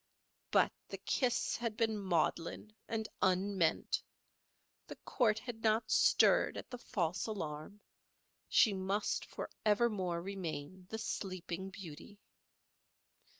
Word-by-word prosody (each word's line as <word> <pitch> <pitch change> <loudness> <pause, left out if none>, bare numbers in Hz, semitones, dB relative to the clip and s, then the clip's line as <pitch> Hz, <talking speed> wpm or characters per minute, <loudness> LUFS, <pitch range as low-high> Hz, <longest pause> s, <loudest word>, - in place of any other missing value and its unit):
But - - +4 0.2
the - - -5
kiss 250 -4 +1
had 230 -2 -3
been 225 -1 +2
maudlin 185 +1 -1
and 220 -1 -2
unmeant; 190 -2 +2 0.9
the - - -7
court 220 -5 +1
had 225 -1 -6
not 220 0 +2
stirred - - +5
at - - -8
the 245 - -6
false 180 -6 -1
alarm; 190 -1 -5 0.7
she 215 - +5
must 195 +2 0
forevermore 205 -6 0
remain 185 -2 -5
the 220 - -3
Sleeping 190 -3 -4
Beauty. 185 +1 -10
200 Hz, 105 wpm, -35 LUFS, 180-220 Hz, 0.9 s, stirred